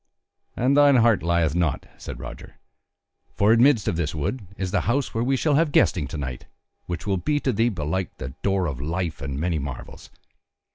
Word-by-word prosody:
"And 130 +3 +2
thine 145 -1 +6
heart 115 -3 +4
lieth 85 -3 +1
not," 85 -4 0
said - - -7
Roger, - - -9 0.8
"for 105 +3 +4
amidst 120 -3 +4
of 85 - 0
this 80 -3 -2
wood 95 - -3
is 95 -2 -3
the - - +1
house 135 +3 0
where 115 - 0
we 135 +2 +1
shall 150 +3 +1
have 155 +1 +3
guesting 80 - +3
to 75 - -6
night, 65 -4 -5 0.4
which 85 -1 -4
will 100 -2 +1
be 145 +10 0
to 130 - 0
thee, 115 +3 +2
belike, 90 0 -3
the 65 - -5
door 95 -2 +1
of 70 -5 -4
life 80 +1 -3
and 70 0 -4
many 85 0 0
marvels. 70 -2 -8
95 Hz, 195 wpm, -24 LUFS, 80-120 Hz, 0.8 s, thine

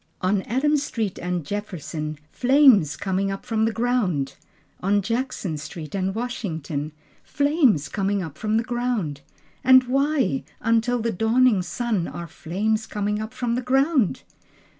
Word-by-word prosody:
On 190 +2 +1
Adams 275 +7 +1
street 225 -9 -3
and 180 -3 -2
Jefferson 160 -6 -4
Flames 245 - +5
coming 195 0 -1
up 195 0 -5
from 220 -1 +1
the 225 - +1
ground! 215 - 0 0.5
On 200 +2 +2
Jackson 220 - -2
street 155 0 -8
and 190 0 -1
Washington 165 - -3 0.3
Flames 285 - +2
coming 200 -1 -1
up 155 -4 -7
from 215 +4 0
the 225 - +1
ground! 235 - -2 0.4
And 260 0 +7
why, 275 +1 +1 0.2
until 230 +1 +1
the 230 - 0
dawning 225 +1 +3
sun 185 +1 -2
Are 170 - -6
flames 215 +7 -2
coming 210 0 -2
up 220 +1 -5
from 245 -2 -2
the 250 - 0
ground? 265 - +2
215 Hz, 140 wpm, -24 LUFS, 180-245 Hz, 0.5 s, And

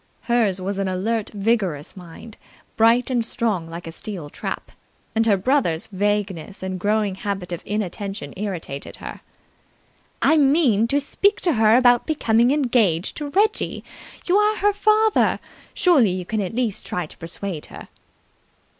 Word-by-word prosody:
Hers 225 -5 +1
was 195 +1 -3
an 195 - 0
alert, 205 +4 -1
vigorous 195 -8 -1
mind, 185 +4 -11 0.4
bright 230 +3 +3
and 240 -2 +1
strong 215 -7 -1
like 170 +1 -7
a 165 - -6
steel 170 -4 -7
trap, - - -5 0.4
and 225 0 +1
her 205 -3 +4
brother's 190 - +1
vagueness 205 -2 -2
and 185 -1 -4
growing 210 +1 +1
habit 195 -2 -4
of 175 - -4
inattention 200 -5 -4
irritated 180 -8 -5
her. - - -9 1.0
"I 320 - +4
mean 270 -7 +3
to 280 +4 +2
speak 400 +8 +1
to 345 - +2
her 220 -1 +4
about 245 -1 +4
becoming 240 -6 +2
engaged 240 - +1
to 295 -1 -4
Reggie. 415 +7 0 0.4
You 365 +2 +3
are 420 +1 +3
her 410 +1 +2
father. 430 +1 +3 0.4
Surely 340 - +4
you 180 0 -3
can 215 +3 -2
at 190 +2 -4
least 235 -5 -1
try 180 - -3
to - - -14
persuade 165 0 -5
her." - - -11
215 Hz, 155 wpm, -22 LUFS, 185-250 Hz, 1.0 s, her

